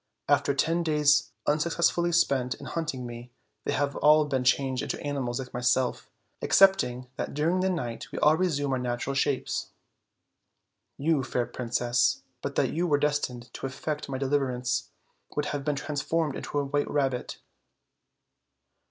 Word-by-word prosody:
After 140 -1 +3
ten 165 +5 +1
days 150 -2 +3 0.2
unsuccessfully 170 +3 +2
spent 135 -6 +2
in - - -11
hunting 155 -7 -3
me, 120 0 -8 0.4
they - - 0
have 140 -1 0
all 150 0 +5
been 135 -3 -1
changed 130 0 +2
into - - -3
animals 135 -4 -2
like 130 -2 -6
myself, 125 +1 0 0.3
excepting 190 -11 +4
that - - -4
during 165 +5 +1
the 190 +1 +1
night 125 -11 -4
we - - -6
all 150 +1 +5
resume 155 -6 0
our 130 - 0
natural 125 +2 -2
shapes. 135 0 -1 1.3
You, 150 0 +2
fair 125 -1 -1
princess, 120 0 0 0.2
but - - -4
that - - +1
you 175 +3 0
were 145 -3 +3
destined 130 -5 -1
to - - -4
effect 150 +3 -4
my 135 - -2
deliver 135 0 +1
ance, 125 +1 -2 0.5
would 150 - 0
have 145 -1 -3
been 150 0 0
transformed 150 +1 -1
into - - -4
a 145 - +1
white 145 +1 -1
rabbit." 135 -4 -1
140 Hz, 155 wpm, -28 LUFS, 125-150 Hz, 1.3 s, all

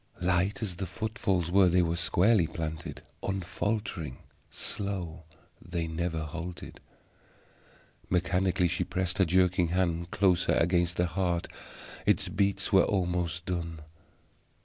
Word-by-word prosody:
Light 90 +4 +1
as 90 -5 -3
the 95 - -3
footfalls 100 -4 -1
were, 95 -1 +6
they 90 +1 +4
were 85 0 0
squarely 95 +1 +3
planted, 80 0 -5 0.2
unfaltering; 95 - -2 0.3
slow, 90 -5 -4 0.4
they 85 -1 -3
never 80 0 -2
halted. 85 +3 -7 1.3
Mechanically 90 0 +2
she 90 +1 -1
pressed 95 0 -2
her 95 - +6
jerking 90 0 +3
hand 85 -1 0
closer 95 -3 +3
against 85 +1 +2
the 90 - +3
heart; 85 0 -1 0.6
its - - +2
beats 100 +1 0
were 95 - +8
almost 90 -2 -1
done. 85 -3 -3
90 Hz, 120 wpm, -29 LUFS, 85-95 Hz, 1.3 s, were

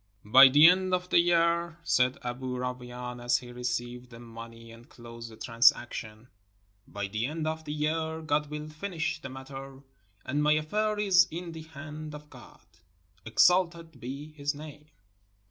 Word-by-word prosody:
"By 130 +6 +9
the 145 +4 +8
end 185 +1 +4
of 180 0 -5
the - - +5
year," 170 0 +2
said 125 -5 +2
Aboo 125 +1 -4
Rawain, 125 -1 -6
as 120 0 +3
he 125 -1 -10
received 120 0 -4
the 115 -1 -12
money 115 0 -11
and 115 +1 -15
closed 115 -1 -10
the 110 - -13
transaction, 115 -1 +1 0.3
— 100 +1 -40
"by 100 0 -4
the 110 +5 -2
end 155 +2 -4
of 160 0 -3
the 150 - -5
year 160 +1 -2
God 150 -1 0
will 150 0 -6
finish 160 -1 -4
the 135 - -7
matter; 135 +1 -10 0.4
and 145 +3 -1
my 150 0 +4
affair 210 +8 0
is 190 -3 +4
in 170 +1 -6
the 160 -1 -8
hand 155 0 -9
of 150 0 -13
God - - -15 0.3
— 90 +1 -36
exalted 170 +3 +2
be 140 +5 -7
his 145 -1 -3
name!" 150 0 -11
145 Hz, 170 wpm, -29 LUFS, 120-160 Hz, 0.4 s, By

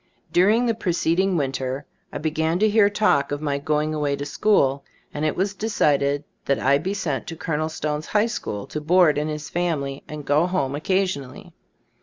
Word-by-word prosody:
During 210 +8 +4
the 230 - +2
preceding 185 -2 +1
winter 135 -1 -2 0.3
I - - -4
be 155 +1 -2
gan 160 +2 0
to 215 +3 +3
hear 210 -1 +4
talk 145 -10 +2
of 145 - -2
my 145 -2 -1
going 150 +1 0
away 145 -2 0
to 140 0 -5
school, 140 -3 +2 0.3
and 150 - -3
it 155 - 0
was 195 +2 0
decided 145 -9 +1 0.2
that 140 - +2
I 140 +2 +3
be 190 +5 -3
sent 145 - -3
to 165 - -5
Col. 155 -1 -2
Stone's 150 -1 -3
High 210 +1 +2
school, 105 - -4
to 150 - -5
board 165 -1 +4
in 150 - -1
his 150 -1 -5
family 150 -6 -2
and 150 -1 -7
go 150 +5 +3
home 145 -7 -1
oc 150 - -7
casionally. 185 -9 -1
155 Hz, 195 wpm, -23 LUFS, 140-185 Hz, 0.3 s, During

